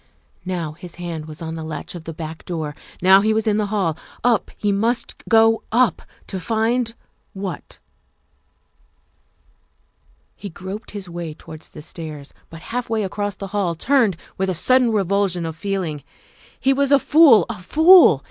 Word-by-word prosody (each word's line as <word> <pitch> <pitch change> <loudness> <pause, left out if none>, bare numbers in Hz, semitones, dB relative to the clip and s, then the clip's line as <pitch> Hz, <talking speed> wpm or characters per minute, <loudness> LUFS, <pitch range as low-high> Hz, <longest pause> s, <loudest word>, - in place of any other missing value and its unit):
Now 175 -4 -3
his 170 +2 -11
hand 170 -3 -6
was 155 +1 -9
on 160 0 -5
the 160 -1 -6
latch 155 0 -6
of 170 -3 -9
the 165 - -5
back 160 0 -7
door; 160 -4 -4 0.3
now 190 +1 +7
he 215 +1 +1
was 220 - 0
in 210 -1 +2
the 210 -1 0
hall; 195 -6 0 0.3
up 240 -2 +2
he 205 - 0
must 230 +5 -1 0.2
go 225 0 +5
up 235 -5 +2 0.2
to 190 - -5
find 230 +3 0 0.4
what? 195 -2 -6 2.6
He 200 - -8
groped 190 +5 -8
his 200 -3 -7
way 170 -3 -6
towards 160 -1 -12
the 150 - -11
stairs, 155 -3 -8 0.2
but 165 0 -11
half 245 -1 -2
way 220 -2 0
across 205 0 -3
the 195 0 -7
hall 190 -5 0
turned 230 - +2 0.2
with 190 0 0
a 185 - -1
sudden 255 +6 +3
revulsion 200 -3 0
of 160 -1 -5
feel 195 +3 -2
ing. 150 -4 -5 0.6
He 270 0 +3
was 280 +1 +1
a 280 - +8
fool 285 -4 +6
a - - -4
fool. 320 - +6
195 Hz, 170 wpm, -21 LUFS, 165-225 Hz, 2.6 s, a